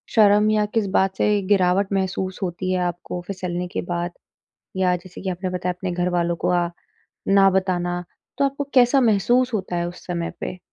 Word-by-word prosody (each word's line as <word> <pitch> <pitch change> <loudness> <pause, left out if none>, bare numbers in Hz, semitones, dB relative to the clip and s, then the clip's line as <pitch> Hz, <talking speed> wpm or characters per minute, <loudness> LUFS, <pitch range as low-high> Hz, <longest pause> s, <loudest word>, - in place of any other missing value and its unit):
शर्म 210 -1 +5
या 210 -1 +2
किस 210 0 -1
बात 190 0 +2
से 210 -1 +2
गिरावट 190 0 +3
महसूस 190 -1 -2
होती 185 +1 -2
है 185 - +1
आपको 175 0 -5
फिसलने 180 -2 -3
के - - -3
बाद? 175 0 -3 0.7
या 180 -1 +3
जैसे 180 +1 -10
कि 190 - -3
आपने 185 +1 -3
बताया 180 0 -2
अपने 180 +1 -4
घर 175 +1 0
वालों 170 -1 0
को - - +2
अ, 175 -1 +2 0.6
ना 195 0 +6
बताना, 175 -2 0 0.4
तो 280 - +3
आपको 275 +1 -1
कैसा 255 +1 +5
महसूस 240 +2 +2
होता 190 -4 -2
है 175 0 -1
उस 175 - -12
समय 170 -2 -2
पे? 185 - -5
185 Hz, 190 wpm, -22 LUFS, 175-205 Hz, 0.7 s, ना